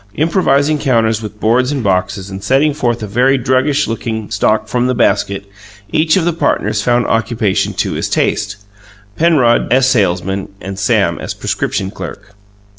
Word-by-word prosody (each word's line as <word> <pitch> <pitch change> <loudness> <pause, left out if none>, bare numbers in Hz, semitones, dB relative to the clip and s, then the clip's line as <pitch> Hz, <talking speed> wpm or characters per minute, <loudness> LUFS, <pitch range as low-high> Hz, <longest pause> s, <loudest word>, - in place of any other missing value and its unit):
Improvising 150 - +2
counters 115 -5 +1
with 105 -1 -8
boards 125 +5 +2
and 140 -4 -2
boxes, 95 0 -1
and 95 +1 -7
setting 140 +6 +2
forth 120 -5 -1
a - - -2
very 125 +6 +2
druggish 130 +4 +1
looking 110 -1 -4
stock 110 +1 +1
from 125 +3 0
the 130 - 0
basket, 100 -2 0 0.5
each 155 +3 +2
of 175 - +1
the 175 - +1
partners 110 -9 0
found 120 +2 +1
occupation 115 -3 0
to - - -1
his - - -2
taste 105 -2 0 0.6
Penrod 145 -7 +3
as 130 +1 +4
salesman 95 -4 0
and 95 0 -7
Sam - - +1
as - - -5
prescription 95 0 -2
clerk. 100 0 -9
115 Hz, 160 wpm, -15 LUFS, 100-135 Hz, 0.6 s, as